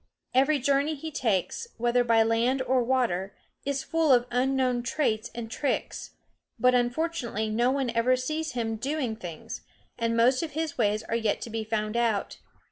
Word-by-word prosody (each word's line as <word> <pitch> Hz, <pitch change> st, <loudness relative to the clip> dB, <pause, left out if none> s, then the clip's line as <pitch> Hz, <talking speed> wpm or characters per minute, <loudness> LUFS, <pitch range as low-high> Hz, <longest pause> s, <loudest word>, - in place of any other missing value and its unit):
Every 275 Hz, +4 st, +4 dB
journey 280 Hz, +3 st, +1 dB
he 315 Hz, +2 st, -6 dB
takes, 230 Hz, -, -1 dB
whether 240 Hz, +1 st, +2 dB
by 230 Hz, -1 st, +4 dB
land 235 Hz, +4 st, +1 dB
or 255 Hz, 0 st, +2 dB
water, 230 Hz, -7 st, 0 dB, 0.3 s
is 275 Hz, -1 st, -1 dB
full 325 Hz, -3 st, +2 dB
of 245 Hz, -2 st, +5 dB
unknown 255 Hz, 0 st, +1 dB
traits 240 Hz, -3 st, -1 dB
and 230 Hz, -1 st, -6 dB
tricks; 280 Hz, +3 st, -3 dB, 0.4 s
but 250 Hz, 0 st, +4 dB
unfortunately 245 Hz, -3 st, 0 dB
no 240 Hz, +3 st, +2 dB
one 265 Hz, -2 st, 0 dB
ever 230 Hz, +2 st, +3 dB
sees 310 Hz, +4 st, -3 dB
him 225 Hz, -2 st, -2 dB
doing 265 Hz, -1 st, -2 dB
things, 175 Hz, -7 st, -7 dB, 0.4 s
and 230 Hz, 0 st, 0 dB
most 250 Hz, +3 st, +4 dB
of 320 Hz, -3 st, -4 dB
his 315 Hz, 0 st, -2 dB
ways 215 Hz, -2 st, +1 dB
are 230 Hz, -, -3 dB
yet 225 Hz, -2 st, 0 dB
to 230 Hz, -, -6 dB
be 225 Hz, 0 st, -2 dB
found 215 Hz, 0 st, -2 dB
out. 230 Hz, -4 st, 0 dB
245 Hz, 170 wpm, -27 LUFS, 225-270 Hz, 0.4 s, of